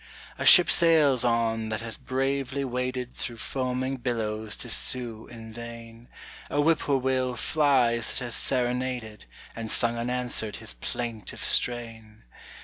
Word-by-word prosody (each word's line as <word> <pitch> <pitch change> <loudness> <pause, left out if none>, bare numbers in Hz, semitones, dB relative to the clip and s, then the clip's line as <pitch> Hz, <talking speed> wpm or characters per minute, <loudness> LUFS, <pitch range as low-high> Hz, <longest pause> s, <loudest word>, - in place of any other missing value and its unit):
A - - 0
ship 180 - +9
sails 155 -7 +4
on 115 -2 +1
that 110 0 -3
has 115 -1 -4
bravely 135 +1 -2
waded 125 0 -3
Through 120 -2 -5
foaming 130 +2 -2
billows 110 -3 -2
to - - -4
sue 115 -1 -1
in 115 -2 -11
vain; 115 0 -10 0.4
A 145 - -1
whip 160 +2 +4
poor 140 -2 +1
will 130 -1 0
flies 125 -5 +2
that 125 - -2
has 120 - -4
serenaded 125 -4 -1 0.3
And 115 -1 -5
sung 115 +1 +1
unanswered 125 -3 -2
his - - -4
plaintive 115 - -5
strain. 115 -3 -2
120 Hz, 140 wpm, -27 LUFS, 115-130 Hz, 0.4 s, ship